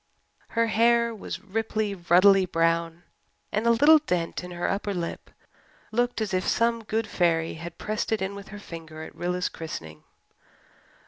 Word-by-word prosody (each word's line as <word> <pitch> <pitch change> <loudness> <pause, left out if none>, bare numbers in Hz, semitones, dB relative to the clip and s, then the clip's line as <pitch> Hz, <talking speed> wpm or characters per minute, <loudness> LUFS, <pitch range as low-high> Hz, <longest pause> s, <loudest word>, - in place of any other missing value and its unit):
Her 230 - +5
hair 235 +1 +3
was 215 - -7
ripely, 215 0 -2
ruddily 185 +2 +5
brown 165 0 0 0.5
and 215 +3 0
a - - +6
little 290 +7 +7
dent 180 - -2
in 180 - -7
her 175 0 -3
upper 200 0 -2
lip 170 -1 -5 0.6
looked 240 +1 0
as 210 -3 -2
if 185 0 0
some 230 0 +1
good 220 +1 -1
fairy 170 -5 +1
had 170 +1 -8
pressed 215 +1 -3
it 220 - +2
in 190 +1 -2
with 200 0 -9
her 205 - -9
finger 160 -5 -9
at - - -10
Rilla's 180 +1 -1
christening. 80 - -8
195 Hz, 165 wpm, -26 LUFS, 170-220 Hz, 0.6 s, little